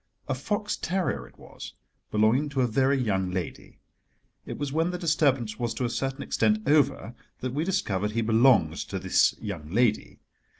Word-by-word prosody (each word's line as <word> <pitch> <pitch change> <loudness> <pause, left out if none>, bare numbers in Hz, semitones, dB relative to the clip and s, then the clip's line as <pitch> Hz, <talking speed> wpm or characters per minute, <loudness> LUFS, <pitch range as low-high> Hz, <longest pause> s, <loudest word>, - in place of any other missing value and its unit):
A 135 - 0
fox 205 - -2
terrier 170 - -2
it - - -22
was, - - -11 0.4
belonging 110 +8 +2
to 135 -2 -1
a - - +3
very 135 +4 +2
young 95 -6 0
lady—it 90 -1 -9
was 145 -1 -4
when 165 +2 +1
the 180 - -3
disturbance 140 - +1
was 120 -2 -2
to 125 - -1
a 120 - -2
certain 135 +2 -3
extent 215 0 0
over 145 -5 +2 0.3
that 130 0 -3
we 150 +3 -1
discovered 105 - -1
he 115 - 0
belonged 110 -7 +4
to - - -4
this - - +2
young 75 - -6
lady. 110 +3 +1
130 Hz, 170 wpm, -27 LUFS, 110-150 Hz, 0.4 s, belonged